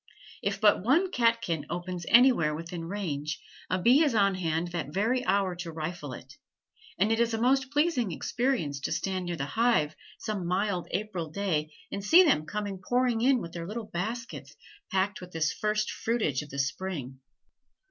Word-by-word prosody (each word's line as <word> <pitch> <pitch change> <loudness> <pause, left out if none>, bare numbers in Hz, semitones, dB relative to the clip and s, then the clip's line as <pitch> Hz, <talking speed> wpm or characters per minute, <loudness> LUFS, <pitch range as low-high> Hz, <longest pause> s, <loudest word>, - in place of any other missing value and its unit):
If - - -1
but 210 -3 +5
one 330 - +3
catkin 230 - +1
opens 175 0 -4
anywhere 235 - +5
within 165 +1 -6
range, 160 -6 -3 0.3
a 185 - +1
bee 250 - +5
is 285 -7 +1
on 200 -2 +4
hand 170 -2 -1
that 170 -5 -4
very 225 +8 +1
hour 190 -1 +1
to 175 -1 -5
rifle 155 -3 -5
it, 130 +2 -11 0.6
and 205 +4 +2
it 225 - +2
is 235 -1 +2
a - - -3
most 265 +3 +2
pleasing 290 - +1
experience 200 - -1
to 140 - -3
stand 185 -2 -2
near 175 - -2
the 135 -4 -3
hive 155 -5 +2 0.2
some 205 -5 -3
mild 185 0 0
April 190 -6 -3
day 155 -4 -1 0.2
and 200 - -4
see 340 - +7
them 255 - +2
come 210 0 -3 0.2
pouring 245 0 +1
in 255 0 +4
with 170 - -7
their 170 -1 -5
little 220 +2 -5
baskets 225 +7 -4 0.4
packed 195 +2 0
with 180 0 -10
this 160 -1 0
first 210 0 -1
fruitage 215 - -1
of 150 - -10
the 140 - -7
spring. 140 -2 -3
190 Hz, 180 wpm, -28 LUFS, 165-230 Hz, 0.6 s, see